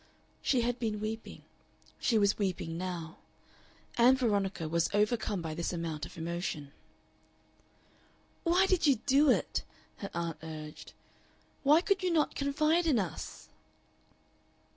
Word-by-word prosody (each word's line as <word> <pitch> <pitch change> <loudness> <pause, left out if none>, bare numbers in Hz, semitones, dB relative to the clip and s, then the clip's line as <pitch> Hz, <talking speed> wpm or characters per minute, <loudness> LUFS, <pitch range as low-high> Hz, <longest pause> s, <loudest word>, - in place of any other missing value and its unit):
She 255 -3 +2
had 245 +1 -1
been 220 -3 -1
weeping. 220 +1 -5 0.6
She 230 - +2
was 200 0 +3
weeping 180 -4 -2
now. 170 -2 -5 0.8
Ann 250 +3 +7
Veronica 200 - 0
was 170 +1 +1
overcome 210 -3 +1
by 160 -1 -3
this 170 +2 -2
amount 165 -3 -3
of - - -15
emotion. 165 -3 -4 1.7
"Why 355 +3 +4
did 370 -4 +2
you 280 - +6
do 285 +2 +5
it?" - - +1 0.3
her 200 - -6
aunt 165 -2 -3
urged. 155 -1 -8 0.7
"Why 300 +4 +6
could 395 +1 +1
you 370 - +1
not 320 -3 +2
confide 305 +4 +1
in 285 -6 +4
us?" 185 -7 -4
210 Hz, 130 wpm, -31 LUFS, 170-280 Hz, 1.7 s, Ann